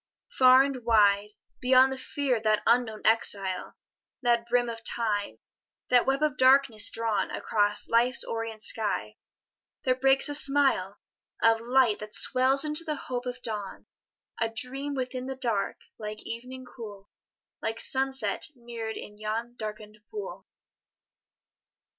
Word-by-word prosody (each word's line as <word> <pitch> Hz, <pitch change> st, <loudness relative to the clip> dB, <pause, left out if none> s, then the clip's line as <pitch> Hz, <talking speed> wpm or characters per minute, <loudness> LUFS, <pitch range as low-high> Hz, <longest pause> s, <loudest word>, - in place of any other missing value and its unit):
Far 255 Hz, 0 st, +6 dB
and 270 Hz, -3 st, -4 dB
wide, 210 Hz, -2 st, +3 dB, 0.2 s
Beyond 260 Hz, +1 st, +4 dB
the -, -, -7 dB
fear 270 Hz, -2 st, -1 dB
of -, -, -7 dB
that 215 Hz, -1 st, +1 dB
unknown 230 Hz, -3 st, +1 dB
exile, 200 Hz, -4 st, 0 dB, 0.5 s
That 235 Hz, -1 st, +1 dB
brim 245 Hz, 0 st, +1 dB
of 230 Hz, -1 st, -6 dB
Time, 210 Hz, -4 st, -1 dB, 0.5 s
that 250 Hz, 0 st, +4 dB
web 270 Hz, +2 st, +1 dB
of 300 Hz, -3 st, 0 dB
darkness 260 Hz, -4 st, +5 dB
drawn 225 Hz, -2 st, -1 dB
Across 205 Hz, -1 st, 0 dB
Life's 240 Hz, +3 st, +3 dB
orient 225 Hz, -1 st, -5 dB
sky, 220 Hz, -2 st, 0 dB, 0.7 s
there 255 Hz, -, +2 dB
breaks 270 Hz, +2 st, +3 dB
a 290 Hz, -, -2 dB
smile 275 Hz, -9 st, +1 dB, 0.4 s
Of 225 Hz, 0 st, +4 dB
light 245 Hz, -2 st, +2 dB
that 210 Hz, 0 st, -7 dB
swells 265 Hz, +2 st, +3 dB
into 305 Hz, +2 st, 0 dB
the 310 Hz, -2 st, -3 dB
hope 250 Hz, -2 st, -5 dB
of 250 Hz, 0 st, -6 dB
dawn: 210 Hz, -3 st, -5 dB, 0.5 s
A 225 Hz, -, 0 dB
dream 270 Hz, +5 st, -4 dB
within 255 Hz, 0 st, -4 dB
the 265 Hz, -, -4 dB
dark, 230 Hz, -6 st, -2 dB, 0.2 s
like 215 Hz, 0 st, -7 dB
evening 255 Hz, +3 st, -8 dB
cool, 210 Hz, -5 st, -11 dB, 0.5 s
Like 225 Hz, +1 st, -3 dB
sunset 265 Hz, 0 st, +1 dB
mirror'd 235 Hz, -2 st, -7 dB
in 210 Hz, 0 st, -10 dB
yon 225 Hz, +3 st, -4 dB
darken'd 215 Hz, -1 st, -8 dB
pool. 420 Hz, -1 st, -8 dB
235 Hz, 140 wpm, -27 LUFS, 215-260 Hz, 0.7 s, Far